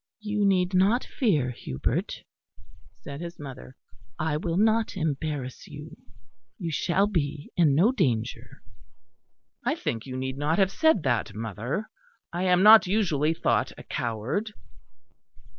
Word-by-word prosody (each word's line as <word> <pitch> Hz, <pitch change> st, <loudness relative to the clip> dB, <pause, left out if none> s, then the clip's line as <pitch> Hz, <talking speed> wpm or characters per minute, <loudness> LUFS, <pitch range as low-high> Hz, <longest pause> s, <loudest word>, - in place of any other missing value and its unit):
"You 210 Hz, -1 st, 0 dB
need 185 Hz, -1 st, +2 dB
not 200 Hz, +7 st, +3 dB
fear, 155 Hz, -, 0 dB
Hubert," 65 Hz, -, -3 dB, 0.8 s
said 140 Hz, +2 st, -7 dB
his 170 Hz, 0 st, -7 dB
mother, 130 Hz, -2 st, -10 dB, 0.4 s
"I 155 Hz, -1 st, -1 dB
will 165 Hz, +2 st, -2 dB
not 220 Hz, 0 st, +2 dB
embarrass 145 Hz, -5 st, -3 dB
you. 150 Hz, +1 st, -10 dB, 0.6 s
You 170 Hz, -4 st, -4 dB
shall 175 Hz, +5 st, +1 dB
be 150 Hz, -7 st, -2 dB
in 155 Hz, -6 st, +4 dB
no 190 Hz, -, +4 dB
danger." 120 Hz, -, -2 dB, 1.0 s
"I -, -, 0 dB
think 115 Hz, +2 st, -4 dB
you 130 Hz, -1 st, -5 dB
need 130 Hz, +1 st, -4 dB
not 150 Hz, +3 st, +1 dB
have 195 Hz, -1 st, +3 dB
said 315 Hz, -, +3 dB
that, 120 Hz, -6 st, 0 dB
mother; 115 Hz, -, -4 dB, 0.5 s
I 175 Hz, +2 st, -1 dB
am 180 Hz, 0 st, +4 dB
not 215 Hz, -1 st, +9 dB
usually 165 Hz, -6 st, +1 dB
thought -, -, 0 dB
a -, -, -10 dB
coward." 120 Hz, -, -3 dB
160 Hz, 135 wpm, -26 LUFS, 130-195 Hz, 1.0 s, not